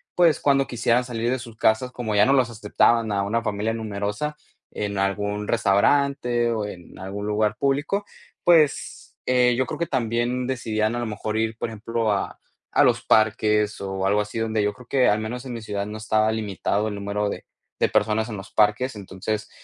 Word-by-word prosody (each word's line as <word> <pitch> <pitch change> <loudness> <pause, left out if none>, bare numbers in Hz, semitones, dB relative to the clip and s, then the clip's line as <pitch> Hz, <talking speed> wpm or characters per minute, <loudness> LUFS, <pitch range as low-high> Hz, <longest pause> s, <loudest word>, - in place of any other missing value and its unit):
pues, 170 -4 +4
cuando 140 -1 +3
quisieran 120 +1 +1
salir 120 -1 -2
de 130 - 0
sus 115 -2 -11
casas, 115 +3 +2
como 115 -4 -3
ya 105 +1 +6
no 135 - +4
los 130 -3 +3
aceptaban 110 +1 +2
a 100 -1 +1
una 115 +3 -1
familia 105 +1 -1
numerosa 105 +6 -3 0.4
en 100 -1 -3
algún 100 +1 -1
restaurante 120 +3 +2
o 110 -2 -1
en 90 -4 -10
algún 100 +2 -5
lugar 105 0 +1
público, 145 +9 0 0.4
pues, 160 -5 +2
eh, 125 -1 +3
yo 130 - +2
creo 155 - -6
que 170 - 0
también 120 0 -1
decidían 110 -3 -1
a - - -2
lo 120 - -2
mejor 105 0 -4
ir 110 0 -1
por - - -2
ejemplo 115 0 -1
a 100 - -3 0.3
a - - +4
los - - +2
parques 105 -1 +2
o 95 -1 -3
algo 105 +2 +3
así. 105 +2 -6
Donde 110 -1 0
yo 105 0 0
creo 125 +1 -15
que 130 -2 +3
al 105 +1 +2
menos 120 +4 -5
en 125 - -5
mi 115 - -6
ciudad 100 -2 -3
no 105 +1 -6
estaba 110 0 +1
limitado 105 -1 -1
el 105 - -3
número 100 +1 -2
de - - -6 0.3
de - - +3
personas 110 0 +1
en 105 - -5
los 95 0 -10
parques. 110 +4 +2
Entonces 105 +2 -4
110 Hz, 200 wpm, -24 LUFS, 105-120 Hz, 0.4 s, ya